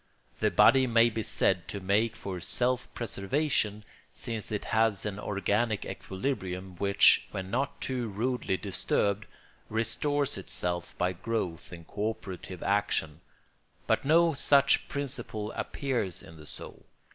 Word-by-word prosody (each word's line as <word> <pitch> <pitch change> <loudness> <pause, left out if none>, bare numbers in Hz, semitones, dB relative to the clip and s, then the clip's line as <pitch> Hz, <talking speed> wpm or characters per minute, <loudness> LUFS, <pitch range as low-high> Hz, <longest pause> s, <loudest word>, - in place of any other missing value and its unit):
The - - +3
body 130 +2 +6
may 115 0 +5
be 110 - -2
said - - +1
to 100 - -5
make 105 +4 +1
for 95 -4 -5
self 125 +8 0
preservation, 105 -1 -1 0.3
since 110 -2 -6
it 105 - -2
has 110 -2 +2
an 105 -1 -3
organic 105 +2 0
equilibrium 95 -4 -4
which, 100 +1 +5
when 95 0 -5
not 135 +4 -1
too 125 -3 -2
rudely 110 -1 -1
disturbed, 100 +2 0 0.4
restores 130 +6 0
itself 90 -1 -3
by 90 +1 +1
growth 90 -4 -3
and 85 -2 -10
co 105 +2 -1
operative 95 -4 -7
action; 85 -6 0 0.6
but - - +1
no 165 +3 +4
such 140 0 +4
principle 120 -6 -3
appears 120 - -2
in 80 - -13
the 75 -1 -13
soul. - - -10
105 Hz, 135 wpm, -29 LUFS, 95-125 Hz, 0.6 s, body